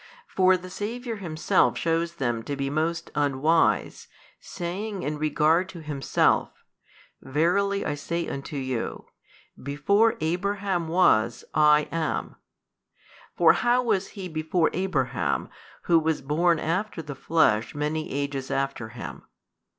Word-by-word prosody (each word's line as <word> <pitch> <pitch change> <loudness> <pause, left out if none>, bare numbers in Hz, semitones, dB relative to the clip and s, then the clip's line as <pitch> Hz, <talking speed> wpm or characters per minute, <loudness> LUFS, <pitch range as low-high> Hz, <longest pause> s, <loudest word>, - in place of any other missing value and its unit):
For 185 0 +3
the 180 0 -10
Saviour 230 +3 -4
Himself 165 -5 +1
shews 165 0 0
them 120 -7 -2
to 145 - -3
be 135 0 -2
most 165 +2 -1
unwise, 145 +3 +1 0.3
saying 190 +3 -5
in 150 0 -3
regard 155 +4 +2
to 175 -3 -9
Himself, 145 -3 0 0.6
Verily 180 +8 +1
I - - -1
say 170 +3 -3
unto 140 +2 -6
you, 130 -3 -3 0.6
Before 200 - +2
Abraham 185 +1 -1
was 120 -10 +2
I 150 0 +5
am: 165 -1 -2 1.0
for - - +6
how 245 +1 +2
was 200 -5 0
He 190 -2 -5
before 160 +1 0
Abraham 135 - -1 0.3
Who 170 -1 +4
was 160 -2 -1
born 165 +4 +2
after 170 +3 -2
the 145 -1 -6
flesh 135 -6 +1
many 150 +2 -2
ages 140 -1 -3
after 135 -4 -2
him? 120 +1 -8
160 Hz, 125 wpm, -26 LUFS, 145-185 Hz, 1.0 s, for